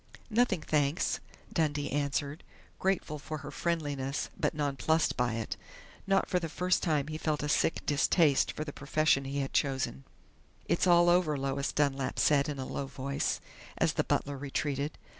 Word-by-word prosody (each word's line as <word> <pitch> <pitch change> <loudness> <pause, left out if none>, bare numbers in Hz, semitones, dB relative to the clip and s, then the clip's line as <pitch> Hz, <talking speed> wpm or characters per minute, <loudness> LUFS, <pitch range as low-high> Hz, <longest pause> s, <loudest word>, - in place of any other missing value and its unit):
"Nothing, 220 -6 +2
thanks," 150 +1 +1 0.3
Dundee 145 -3 0
answered, 145 +1 -1 0.4
grateful 185 -5 0
for 155 +2 -5
her - - -6
friendliness 145 -5 -2
but - - -1
nonplussed 150 +2 +1
by 120 -1 +1
it. 115 -1 -3 0.5
Not 195 0 +3
for 180 - +1
the 165 -2 -4
first 180 +3 +1
time 150 -4 +1
he 155 0 -5
felt 155 -2 -1
a - - -1
sick 150 - +1
distaste 145 0 +3
for 155 - -4
the 145 -2 -7
profession 145 -1 +2
he 140 +1 -2
had 135 - -4
chosen.... 130 - 0 0.6
"It's 170 +3 +2
all 175 -1 +6
over," 175 -4 +3
Lois 135 0 -1
Dunlap 140 -2 0
said 145 0 +3
in 145 - -3
a 130 - -4
low 140 - -4
voice, 140 +1 -2 0.4
as - - +2
the - - +1
butler 140 -1 -1
retreated. 145 +1 -2
145 Hz, 165 wpm, -31 LUFS, 140-160 Hz, 0.6 s, all